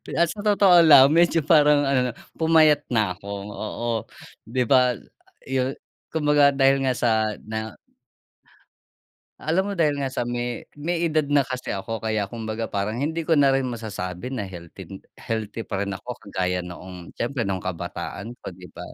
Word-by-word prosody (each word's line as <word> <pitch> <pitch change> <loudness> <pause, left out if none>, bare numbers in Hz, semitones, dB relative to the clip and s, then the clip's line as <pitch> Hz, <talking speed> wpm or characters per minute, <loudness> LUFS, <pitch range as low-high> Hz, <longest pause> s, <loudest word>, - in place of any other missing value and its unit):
Pi - - -9
ah, 170 - +5
sa 205 +4 -6
totoo 195 -5 +5
lang 145 -4 +8
medyo 170 0 +4
parang 150 -2 +5
ano 130 -2 +1
'no, - - -8 0.2
pumayat 160 -2 +4
na 105 -6 +1
ako, 100 +2 -16 0.3
oo. 120 +2 -4 0.6
'Di 125 +2 0
ba 125 -1 +5 0.6
yu 130 0 0 0.4
kumbaga 150 -2 +4
dahil 135 0 +3
nga 130 -1 +1
sa 110 -3 +1
na 110 -1 -5 1.6
Alam 185 +6 0
mo 200 - -2
dahil 150 -4 +1
nga 135 - -1
sa 120 - -3
may 120 0 -4 0.2
may 170 +2 -1
edad 155 -2 +1
na 145 -2 +3
kasi 130 0 -6
ako, 100 +3 -4
kaya 110 -2 -1
kumbaga 110 +1 -5
parang 105 +2 -2
hindi 155 +6 -2
ko 165 0 +1
na 140 -2 +5
rin 135 -1 0
masasabi 110 -2 -5
na 105 -7 -4
healthy 90 +1 -10 0.2
healthy 110 0 -5
pa 100 -2 -3
rin 100 - -4
ako 120 +6 -7
kagaya 90 -2 -2
noong 90 0 -10
siyempre 120 0 -2
no'ng 95 -2 -2
kabataan 90 +5 -5
ko, - - -7
'di 90 0 -11
ba. - - -11
120 Hz, 170 wpm, -24 LUFS, 105-145 Hz, 1.6 s, lang